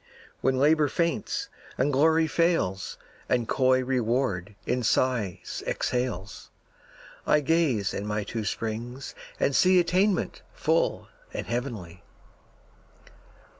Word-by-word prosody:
When 130 0 +1
Labor 150 +2 +4
faints, 170 +2 -1 0.3
and 140 +3 +1
Glory 160 +4 +4
fails, 160 - 0 0.3
And 120 -2 +1
coy 130 -1 +3
Reward 120 -6 -1
in 125 +1 0
sighs 115 -5 0
exhales, 125 -7 -2 0.8
I 150 - +5
gaze 140 -10 +1
in 100 - -4
my 105 0 -1
two 110 +2 -4
springs 115 +5 -4 0.3
and 140 - +1
see 185 0 +5
Attainment 185 +3 +1
full - - +1 0.3
and - - -3
heavenly. 115 -8 -4
130 Hz, 105 wpm, -27 LUFS, 110-155 Hz, 0.8 s, I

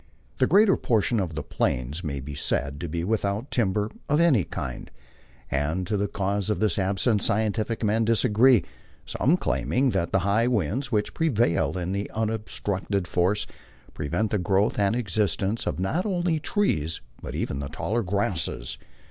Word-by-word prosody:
The 130 - +4
greater 200 +2 +5
portion 115 0 +1
of 85 -5 -2
the 80 - -3
Plains 70 +2 -2
may 70 -4 -3
be 70 +2 -7
said 70 0 -1
to 85 - -4
be 85 +2 -2
without 105 +4 -1
timber 105 -2 0 0.2
of 150 +2 +3
any 155 - +4
kind. - - -6 0.6
As 80 +6 0
to 105 - -1
the 100 0 0
cause 100 +1 -1
of 105 - 0
this 110 -1 +1
absence 100 +3 +1
scientific 110 +2 +1
men 110 +2 +2
disagree, 115 0 +4 0.4
some 160 +7 +2
claiming 130 -6 +1
that 85 - -1
the 95 - +2
high 110 +4 +3
winds 125 - -1
which 105 -2 0
prevail 120 - +1
in 95 +3 -2
unobstructed 105 -3 -2
force 95 +5 +1 0.5
prevent 100 +9 -1
the 105 - +1
growth 95 +5 +1
and 100 +2 +2
existence 105 -1 -1
of - - -1
not 160 - 0
only 175 -4 0
trees 85 - 0 0.2
but - - -6
even 70 - -2
the 70 -1 -4
taller 110 +9 -1
grasses. 95 - -2
105 Hz, 160 wpm, -26 LUFS, 90-115 Hz, 0.6 s, greater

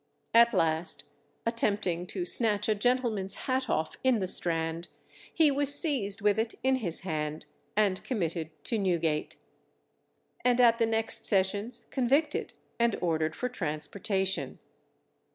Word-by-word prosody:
At 235 0 +6
last, 160 +1 -1 0.4
attempting 200 -6 -1
to 180 -2 -4
snatch 210 +1 +2
a 215 - +3
gentleman's 215 -3 0
hat 260 0 -1
off 155 0 -1
in 260 -2 +3
the 190 -3 -2
Strand, 165 -1 +2 0.4
he 315 -3 +3
was 285 +1 +5
seized 225 - +2
with 210 +1 +2
it 225 0 -2
in 265 0 +2
his 180 -10 -4
hand, 155 -4 -4 0.3
and 200 -3 +1
committed 170 - -3
to 225 - -1
Newgate, 170 -5 -1 1.1
and 250 0 +2
at 235 -1 +5
the 230 - +2
next 225 0 0
sessions 205 +4 0
convicted 275 +4 0 0.2
and 235 -2 +2
ordered 160 -2 -1
for 250 - -2
transportation. 190 0 -2
205 Hz, 135 wpm, -29 LUFS, 175-235 Hz, 1.1 s, At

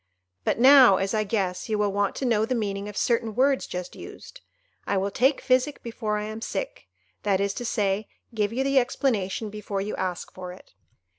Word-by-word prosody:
But - - 0
now, 255 -5 +8
as 195 +1 -1
I 215 -1 +1
guess, 195 -2 -2
you 215 - +1
will 205 -1 +1
want 200 0 0
to 270 - -3
know 225 -3 +2
the 250 +3 0
meaning 200 -2 -3
of 210 - -9
certain 230 -3 0
words 270 +1 +2
just 180 0 -6
used; - - -11 0.5
I 200 - +1
will 195 +1 -1
take 265 +7 +2
physic 260 +2 +1
before 220 -2 -3
I 210 - -3
am 215 +1 -6
sick—that 220 - -4
is 200 0 0
to 245 - -5
say, 205 -2 0 0.3
give 210 -2 0
you 255 +3 -1
the 275 0 +4
explanation 225 -5 -1
before 210 -1 -4
you 200 +2 -3
ask 180 -2 -4
for 180 -1 -7
it. 185 - -17
215 Hz, 200 wpm, -25 LUFS, 200-250 Hz, 0.5 s, now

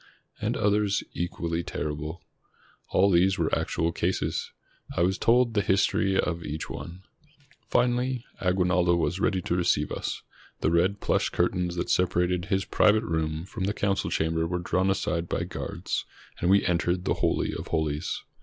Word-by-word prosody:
And - - 0
others 105 -1 +2
equally 85 -1 -2
terrible. 75 0 -4 0.7
All 100 +2 +4
these 95 +2 +4
were - - 0
actual 85 0 0
cases. 90 +2 -1 0.5
I - - +2
was 95 +2 +1
told 120 0 +4
the 105 - +2
history 95 0 +2
of 85 -1 -1
each 75 +1 -5
one. 90 +2 -8 0.7
Finally 125 0 +1
Aguinaldo 90 -1 +2
was 85 +2 0
ready 95 -3 +1
to 85 - 0
receive 80 -4 +1
us. - - -4 0.4
The 80 - +2
red 90 +4 +2
plush - - +1
curtains 90 -1 0
that 85 - -2
separated 90 0 +1
his 95 -1 0
private 110 +1 +3
room 80 -3 -2
from 95 0 -4
the 105 +2 -1
council 100 -1 0
chamber 80 +1 0
were 90 +1 -1
drawn 90 +2 0
aside 85 -3 -1
by - - -1
guards, - - -4 0.3
and 85 - +1
we 100 +1 +5
entered 90 +1 0
the - - +2
holy - - +1
of - - -6
holies. 75 -1 -2
90 Hz, 160 wpm, -27 LUFS, 85-95 Hz, 0.7 s, we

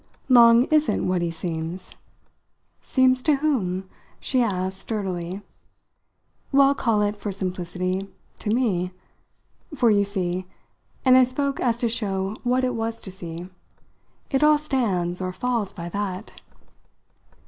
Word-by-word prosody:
"Long 235 -1 +7
isn't 310 0 +2
what 180 -1 +1
he 170 - 0
seems?" 165 +1 -4 0.9
"Seems 255 -1 +3
to 300 +2 +3
whom?" 200 -11 -1 0.3
she 260 -2 +1
asked 190 -4 -1
sturdily. 190 -4 -4 1.1
"Well, 275 0 +5
call 225 -6 +1
it 205 0 0
for 205 0 -5
simplicity 185 0 -3 0.3
to - - -4
me. 200 -6 0 0.8
For 240 -4 +4
you 205 -1 +4
see" 185 -2 -2 0.6
and 255 -1 +7
I 260 - +8
spoke 275 +2 -1
as 235 -2 +1
to 240 - +2
show 200 -3 -2
what 250 +1 +1
it 250 -1 +1
was 225 0 -3
to 190 - -8
see 175 -1 -7 0.8
"it 270 0 +2
all 300 0 +6
stands 195 - -1
or 185 0 -2
falls 235 0 -1
by 170 - -7
that." 200 +1 -5
205 Hz, 135 wpm, -24 LUFS, 185-250 Hz, 1.1 s, I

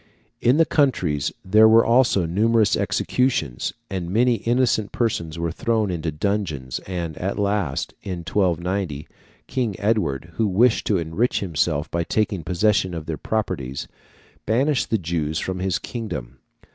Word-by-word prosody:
In 125 +4 +4
the 165 - +5
counties 90 - +1
there 110 +4 +6
were 115 +1 +6
also 115 -6 +3
numerous 105 +4 +2
executions, 100 - 0 0.2
and 90 -3 -4
many 120 +4 +3
innocent 115 -1 +1
persons 85 -10 -1
were 85 0 -2
thrown 110 +2 0
into 85 -2 -2
dungeons; 75 -6 -2
and, 85 -4 -4
at 95 +2 -2
last, 100 -8 -1
in 90 -3 -5
1290 90 -3 -1 0.4
King 120 -7 -2
Edward, 95 -7 0
who 110 - +2
wished 110 +5 +3
to 105 - +3
enrich 85 +9 0
himself 80 -4 -1
by 85 0 0
taking 100 -1 -1
possession 95 +1 +1
of 80 -2 -5
their 80 - -3
properties, 70 - -3 0.6
banished 130 +5 +1
the 110 - +2
Jews 80 -4 -2
from 95 +2 -3
his 95 -1 0
kingdom. 70 - -6
95 Hz, 145 wpm, -23 LUFS, 80-110 Hz, 0.6 s, there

